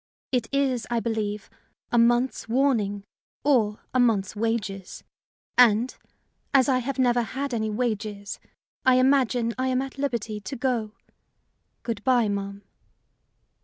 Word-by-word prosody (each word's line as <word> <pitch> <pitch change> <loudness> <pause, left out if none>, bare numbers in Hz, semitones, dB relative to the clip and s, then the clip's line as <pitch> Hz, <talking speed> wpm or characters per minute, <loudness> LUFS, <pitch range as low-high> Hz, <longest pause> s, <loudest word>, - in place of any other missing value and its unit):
It 245 -3 0
is, 270 -4 0
I 240 -1 +1
believe, 215 -3 -2 0.4
a 240 - +4
month's 240 +1 +2
warning 225 -6 +1 0.4
or 225 -7 +2
a 255 - +2
month's 220 -6 +2
wages; 205 -4 -3 0.6
and, 240 +1 +5 0.6
as 265 0 +6
I 260 -2 +3
have 270 +2 -3
never 245 -2 +3
had 265 +5 -4
any 220 -2 -1
wages, 210 -3 -3 0.4
I 260 -1 +5
imagine 255 -3 +3
I 260 - +1
am 255 -1 +1
at 270 +1 -5
liberty 230 -6 -2
to 205 +6 -6
go. 235 -4 -1 0.9
Good 230 -3 -4
by, 245 -4 +3
ma'am." 200 0 -4
235 Hz, 130 wpm, -25 LUFS, 210-255 Hz, 0.9 s, as